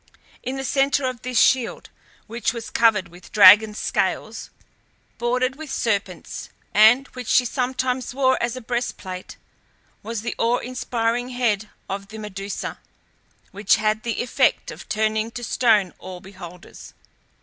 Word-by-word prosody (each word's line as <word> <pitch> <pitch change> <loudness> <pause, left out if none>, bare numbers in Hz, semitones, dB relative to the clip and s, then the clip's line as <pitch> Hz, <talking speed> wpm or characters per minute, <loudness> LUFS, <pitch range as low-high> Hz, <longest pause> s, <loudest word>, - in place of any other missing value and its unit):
In 255 +2 -4
the 270 - -4
centre 275 +1 +1
of 255 -3 -3
this 250 -2 0
shield, 255 -3 +2 0.3
which 230 0 -2
was 230 -2 -7
covered 210 -6 +3
with 175 +1 -15
dragon's 210 +1 +7
scales, - - -2 0.7
bordered 255 +2 0
with 315 -1 -8
serpents, 200 -8 -3 0.2
and 220 +6 +6
which 250 -3 -8
she 250 - +4
sometimes 255 0 -1
wore 260 0 +2
as 235 +1 -1
a 255 - -7
breastplate, 225 -6 -5 0.6
was 225 0 -4
the 240 - -2
awe 235 +2 +2
inspiring 245 -1 -2
head 225 -4 -1 0.2
of 195 +1 -5
the 220 +2 -10
Medusa, 200 -2 -6 0.7
which 200 +1 +3
had 215 0 0
the 230 0 -2
effect 245 - +1
of - - -11
turning 220 +1 0
to 240 +1 -8
stone 220 -6 +2
all 185 -1 -8
beholders. 180 -2 -12
230 Hz, 140 wpm, -23 LUFS, 205-250 Hz, 0.7 s, dragon's